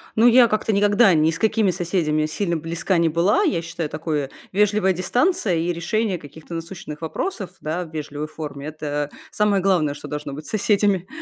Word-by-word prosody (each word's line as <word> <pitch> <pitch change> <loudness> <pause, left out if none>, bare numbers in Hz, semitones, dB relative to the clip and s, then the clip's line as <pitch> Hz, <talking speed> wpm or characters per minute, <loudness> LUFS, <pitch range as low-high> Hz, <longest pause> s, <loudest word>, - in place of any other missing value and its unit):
Ну, 230 +2 +5
я 240 0 +7
как-то 215 0 0
никогда 205 0 +5
ни 155 +1 +3
с 165 - -5
какими 215 -3 +2
соседями 165 -4 0
сильно 170 +1 -1
близка 170 +3 -1
не 165 -1 +3
была. 175 - +2
Я 295 - +1
считаю, 165 -2 -4
такое: 150 -3 -2 0.2
вежливая 205 -1 +3
дистанция 230 - +1
и 170 +2 0
решение 200 +3 -1
каких-то 155 +3 -12
насущных 165 -2 -7
вопросов, 190 - -4
да, 165 +4 -2
в 160 - -14
вежливой 150 0 -4
форме- 150 -3 -7
это 150 -1 -3 0.2
самое 205 -2 +2
главное, 175 -7 +2
что 145 - -9
должно 150 -1 -5
быть 150 +2 -8
с - - -10
соседями. 200 -3 +1
170 Hz, 180 wpm, -22 LUFS, 155-205 Hz, 0.2 s, я